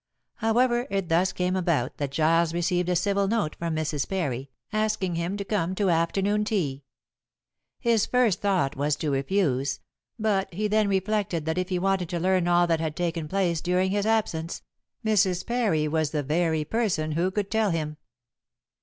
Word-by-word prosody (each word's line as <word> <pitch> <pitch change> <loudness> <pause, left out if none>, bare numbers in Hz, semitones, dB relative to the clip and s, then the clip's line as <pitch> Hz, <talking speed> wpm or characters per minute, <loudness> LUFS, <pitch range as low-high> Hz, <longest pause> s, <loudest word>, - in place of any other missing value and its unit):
However, 240 +2 +2
it 195 -3 -2
thus 175 +3 +3
came 180 +1 -1
about 170 -9 0
that 145 -2 -2
Giles 165 +3 +2
received 175 +1 0
a 180 - +2
civil 200 +2 +1
note 205 -7 0
from 170 -1 -2
Mrs. 155 -3 -2
Parry, 140 -8 -2 0.2
asking 215 -4 0
him 170 +4 -2
to 200 - -4
come 185 -3 -1
to 195 -2 +2
afternoon 195 +5 +1
tea. 145 -11 -2 0.9
His 230 -3 +2
first 245 -7 +2
thought 190 -9 +1
was 145 +2 0
to 150 0 -2
refuse, 140 -1 0 0.4
but 210 -3 0
he 210 +5 -1
then 215 0 +2
reflected 195 -4 0
that 160 +2 -1
if 185 - -2
he 185 - 0
wanted 190 -1 0
to 175 - -2
learn 185 0 +2
all 175 0 +4
that 165 -2 +1
had 160 -2 -2
taken 165 -2 -2
place 175 -2 0
during 180 +1 +1
his 205 +1 0
absence, 175 -7 -1 0.4
Mrs. 195 -4 +2
Parry 215 -11 +1
was 155 -1 0
the 150 -1 -2
very 160 +1 0
person 175 -6 0
who 170 +4 +1
could 200 +1 -3
tell 220 -2 +2
him. 155 -3 -2
180 Hz, 175 wpm, -26 LUFS, 160-200 Hz, 0.9 s, all